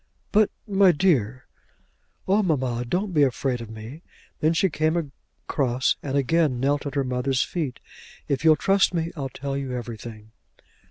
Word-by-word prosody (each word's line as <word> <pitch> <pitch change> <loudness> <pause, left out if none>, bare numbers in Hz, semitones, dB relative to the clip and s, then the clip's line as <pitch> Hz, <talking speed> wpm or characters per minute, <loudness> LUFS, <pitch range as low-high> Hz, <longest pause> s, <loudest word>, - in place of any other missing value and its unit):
"But 210 0 +4 0.2
my 195 -2 +5
dear 135 - +1 0.4
" - - -42
"Oh 200 +3 +4
mamma; 130 - 0
don't 185 - -2
be 150 - +3
afraid 130 -2 +1
of 115 - -8
me." 110 +8 -9 0.4
Then 155 - +3
she 180 +4 +3
came 155 0 0 0.5
across, 130 -2 +1
and 140 -1 -2
again 140 -1 +2
knelt 145 +2 0
at 140 - -6
her 140 - +1
mother's 130 +1 0
feet. 155 -8 -4 0.5
"If 140 0 -1
you'll 160 -1 +7
trust 195 +3 +2
me 165 0 -1
I'll 135 -4 -4
tell 135 +2 -5
you 135 -2 -3
everything." 115 -2 -7
140 Hz, 165 wpm, -24 LUFS, 125-165 Hz, 0.5 s, you'll